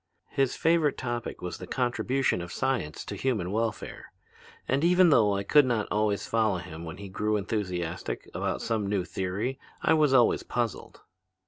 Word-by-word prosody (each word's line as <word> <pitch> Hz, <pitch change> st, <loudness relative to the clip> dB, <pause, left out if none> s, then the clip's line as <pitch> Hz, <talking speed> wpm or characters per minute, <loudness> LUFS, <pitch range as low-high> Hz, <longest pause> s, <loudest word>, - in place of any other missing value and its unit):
His 135 Hz, -2 st, +1 dB
favorite 165 Hz, -3 st, +2 dB
topic 120 Hz, -5 st, -4 dB
was 90 Hz, -, -5 dB
the -, -, -8 dB
contribution 125 Hz, -3 st, 0 dB
of 85 Hz, +1 st, -7 dB
science 130 Hz, -, -2 dB
to -, -, -5 dB
human 105 Hz, -9 st, -1 dB
welfare. 110 Hz, 0 st, -3 dB, 0.6 s
And 135 Hz, +3 st, +1 dB
even 180 Hz, 0 st, +5 dB
though 105 Hz, -7 st, +4 dB
I 100 Hz, -, -1 dB
could 145 Hz, +6 st, +5 dB
not 115 Hz, -4 st, 0 dB
always 105 Hz, -1 st, +1 dB
follow 110 Hz, -4 st, +1 dB
him 85 Hz, -2 st, -8 dB
when 80 Hz, +1 st, -7 dB
he 100 Hz, 0 st, -8 dB
grew 105 Hz, +3 st, 0 dB
enthusiastic 90 Hz, -4 st, -3 dB
about -, -, -2 dB
some 110 Hz, -3 st, -1 dB
new 100 Hz, -3 st, 0 dB
theory 100 Hz, +9 st, -3 dB, 0.2 s
I -, -, +4 dB
was 155 Hz, -3 st, +4 dB
always 125 Hz, -3 st, +4 dB
puzzled. 120 Hz, -2 st, -3 dB
110 Hz, 165 wpm, -28 LUFS, 95-130 Hz, 0.6 s, even